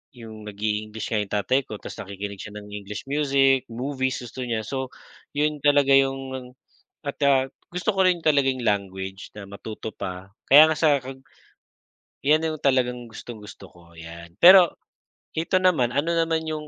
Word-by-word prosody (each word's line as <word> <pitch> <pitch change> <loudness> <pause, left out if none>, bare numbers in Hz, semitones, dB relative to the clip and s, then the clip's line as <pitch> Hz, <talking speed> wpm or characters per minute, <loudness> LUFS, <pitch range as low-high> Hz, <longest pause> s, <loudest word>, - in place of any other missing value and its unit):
yung 110 -2 -11
nag-i-English 105 +1 -4
nga 105 - +2
yung 100 - -6
tatay 130 +7 +1
ko 105 -5 -8
tapos - - -9
nakikinig 100 0 -7
siya 105 - -9
ng 105 0 -10
English 105 +2 -7
music, 135 -2 +2
movies, 130 +2 -2
gusto 130 +2 -8
niya 115 -3 -3
so 130 -1 -4 0.5
yun 150 -1 0
talaga 145 -1 +4
yung, 135 -1 +1 0.6
at, - - -4
ah, 135 -1 +4 0.2
gusto 180 +4 -1
ko 190 - +1
rin 185 -2 +4
talaga 140 -3 +4
yung 130 -2 -3
language 95 -1 -2
na 100 - -8
matuto 105 +2 -8
pa 95 +1 -7 0.2
kaya 150 +3 +10
nga 160 - +1
sa 150 -2 +3
kag 130 0 -9 1.0
yan 150 +3 +4
na 160 -1 -1
yung 155 - -11
talagang 125 -3 +1
gustong-gusto 105 -3 -10
ko, 90 - -19 0.2
yan. 85 +1 -11
Pero, 180 -1 +8 0.6
ito 185 +3 +1
naman 130 -10 +2
ano 160 +4 +1
naman 165 -1 +1
yung 155 -1 -5
130 Hz, 170 wpm, -24 LUFS, 105-145 Hz, 1.0 s, kaya